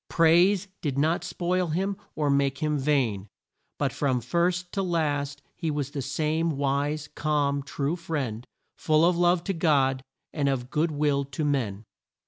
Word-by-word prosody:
Praise 175 +4 +4
did 140 -4 -2
not 160 +4 +1
spoil 180 0 -1
him 190 +5 -1 0.2
or 150 -2 +1
make 140 -1 +1
him 150 0 0
vain; 130 -9 0 0.5
but - - 0
from 130 -3 0
first 175 +7 0
to 195 - -1
last 145 -5 -1
he 165 - -3
was 145 -2 -2
the 140 - -3
same 155 +3 -1
wise, 145 +2 -1
calm, 145 -2 0
true 140 +3 -2
friend, 140 -9 -4 0.3
full 155 +1 +3
of 175 0 +3
love 175 0 +3
to 195 - -1
God 140 -6 +2 0.3
and 145 -3 +1
of 125 -2 -2
good 160 +3 +1
will 145 -2 +1
to 140 +3 -3
man. 115 -8 -1
150 Hz, 160 wpm, -26 LUFS, 140-165 Hz, 0.5 s, Praise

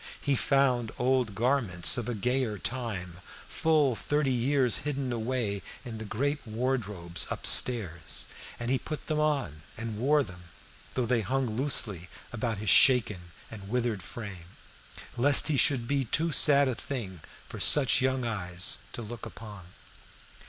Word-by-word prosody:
He 140 -2 0
found 125 -4 +1
old 125 -4 0
garments 115 -7 +4
of 120 -1 -3
a 120 - -2
gayer 125 0 -1
time, 100 -7 -4 0.3
full 150 -6 +1
thirty 145 +2 0
years 125 0 +1
hidden 140 -3 -3
away 115 -4 -2 0.2
in 115 -3 -7
the 110 - -6
great 140 +8 -2
wardrobes 110 -7 -3
up - - -5
stairs, 95 -10 +1 0.3
and 120 +1 -3
he 130 - +1
put 155 -2 -7
them 155 -1 -1
on 140 - -1 0.2
and 115 -1 -5
wore 145 +4 +3
them, 90 -5 -12 0.5
though 125 - 0
they 120 -1 +1
hung 125 +1 -2
loosely 105 - -1 0.2
about 115 -2 -2
his 105 0 0
shaken 105 -9 +4 0.2
and 100 -3 -10
withered 120 -4 -1
frame, 95 -7 -9 0.6
lest 140 +5 +4
he 150 - +1
should 130 -4 +2
be 140 -1 0
too 160 +8 0
sad 140 -1 +6
a 130 - 0
thing 110 - -6 0.3
for - - -9
such 135 -3 +5
young 130 -1 0
eyes 90 -5 -1
to 120 - -6
look 115 +1 -8
upon. 105 -5 -11
120 Hz, 150 wpm, -28 LUFS, 105-135 Hz, 0.6 s, sad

